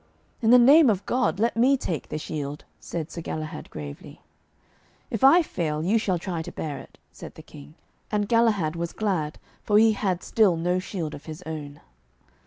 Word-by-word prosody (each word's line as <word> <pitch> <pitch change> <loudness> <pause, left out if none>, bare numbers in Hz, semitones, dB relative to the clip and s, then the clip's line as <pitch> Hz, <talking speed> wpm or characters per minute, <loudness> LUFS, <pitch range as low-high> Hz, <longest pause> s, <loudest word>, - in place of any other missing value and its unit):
'In 225 - +2
the 250 - +8
name 275 +4 +7
of 200 -2 0
God, 250 -5 0
let 230 +2 +1
me 260 +4 +4
take 170 - -4
the - - -3
shield,' 150 -1 -5
said 165 -1 -5
Sir 170 - -6
Galahad 155 0 -6
gravely. 70 -1 -9 0.9
'If 225 - -3
I 330 +6 +7
fail, 155 - -3
you 210 +6 +2
shall 190 -4 0
try 170 -1 -4
to - - -7
bear 150 -3 -5
it,' - - -15
said - - -11
the - - -12
King. 70 +2 -14 0.4
And 205 -1 0
Galahad 215 -9 +2
was 170 0 -4
glad, 180 -8 -2 0.2
for 210 - +2
he 220 +1 +6
had 190 -4 -1
still 210 -6 +3
no 180 +2 0
shield 175 -5 -5
of 140 - -10
his 160 +2 -8
own. 150 -2 -7
180 Hz, 190 wpm, -25 LUFS, 155-220 Hz, 0.9 s, the